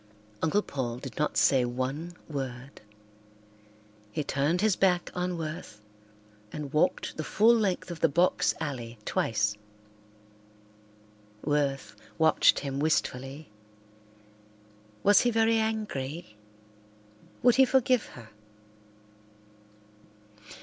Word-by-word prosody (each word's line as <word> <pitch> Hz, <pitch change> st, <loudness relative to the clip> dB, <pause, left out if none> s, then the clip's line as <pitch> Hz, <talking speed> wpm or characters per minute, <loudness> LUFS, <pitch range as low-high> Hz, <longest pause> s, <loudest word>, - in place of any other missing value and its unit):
Uncle 200 Hz, +6 st, +2 dB
Paul 120 Hz, -4 st, -4 dB
did 130 Hz, 0 st, -8 dB
not 150 Hz, -, 0 dB
say 130 Hz, -2 st, +4 dB
one 130 Hz, +8 st, -3 dB
word. 135 Hz, -2 st, -6 dB, 1.3 s
He 150 Hz, -, -2 dB
turned 145 Hz, +6 st, 0 dB
his 215 Hz, -3 st, +3 dB
back 180 Hz, -2 st, +1 dB
on 180 Hz, 0 st, -2 dB
Worth 155 Hz, -9 st, -6 dB, 0.7 s
and 150 Hz, -1 st, -6 dB
walked 150 Hz, -, 0 dB
the 155 Hz, -, -3 dB
full 220 Hz, +8 st, +4 dB
length 195 Hz, -5 st, -1 dB
of 170 Hz, -, -7 dB
the 165 Hz, -, +3 dB
box 175 Hz, +6 st, +2 dB
alley 120 Hz, -5 st, -5 dB
twice. 105 Hz, -1 st, 0 dB, 1.9 s
Worth 140 Hz, -6 st, -1 dB, 0.2 s
watched 160 Hz, -1 st, +4 dB
him 140 Hz, -1 st, -4 dB
wistfully. 140 Hz, -2 st, -1 dB, 1.5 s
Was 205 Hz, 0 st, +6 dB
he 245 Hz, -, +2 dB
very 225 Hz, 0 st, +3 dB
angry? 170 Hz, -, -3 dB, 1.1 s
Would 245 Hz, 0 st, +5 dB
he 265 Hz, -, +7 dB
forgive 255 Hz, -2 st, +2 dB
her? 115 Hz, -3 st, -12 dB
155 Hz, 100 wpm, -28 LUFS, 135-185 Hz, 1.9 s, he